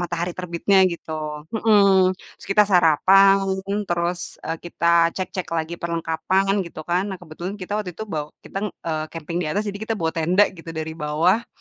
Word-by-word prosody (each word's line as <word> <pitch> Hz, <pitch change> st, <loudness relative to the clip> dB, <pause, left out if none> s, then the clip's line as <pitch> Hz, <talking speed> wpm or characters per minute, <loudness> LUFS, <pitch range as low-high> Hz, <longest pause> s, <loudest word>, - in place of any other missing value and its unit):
matahari 175 Hz, 0 st, -2 dB
terbitnya 180 Hz, +2 st, 0 dB, 0.2 s
gitu, 165 Hz, -, -9 dB, 0.5 s
mhm. 200 Hz, -4 st, +4 dB, 0.2 s
Terus -, -, -15 dB
kita 210 Hz, +1 st, +6 dB
sarapan, 190 Hz, +3 st, +5 dB, 0.3 s
terus, 175 Hz, 0 st, 0 dB, 0.3 s
e -, -, -7 dB, 0.2 s
kita 170 Hz, 0 st, -6 dB, 0.3 s
cek-cek 185 Hz, -1 st, -4 dB
lagi 160 Hz, +1 st, -2 dB
perlengkapan 170 Hz, +3 st, 0 dB
gitu 160 Hz, -, -9 dB
kan. 180 Hz, +2 st, +2 dB
Nah 190 Hz, -, -4 dB
kebetulan 175 Hz, +4 st, -7 dB
kita 185 Hz, -, -6 dB
waktu 185 Hz, -4 st, -5 dB
itu 220 Hz, -, -5 dB
baw 150 Hz, -1 st, -1 dB, 0.2 s
kita, -, -, -5 dB, 0.3 s
eee, 155 Hz, -1 st, -1 dB
camping 165 Hz, 0 st, -6 dB
di 160 Hz, -, -2 dB
atas, 205 Hz, +7 st, -1 dB
jadi 200 Hz, 0 st, -5 dB
kita 225 Hz, -, -1 dB
bawa 160 Hz, -1 st, 0 dB
tenda 175 Hz, +5 st, +3 dB
gitu 165 Hz, 0 st, -12 dB
dari 160 Hz, 0 st, -4 dB
bawah 175 Hz, +10 st, +2 dB
175 Hz, 170 wpm, -22 LUFS, 165-195 Hz, 0.5 s, kita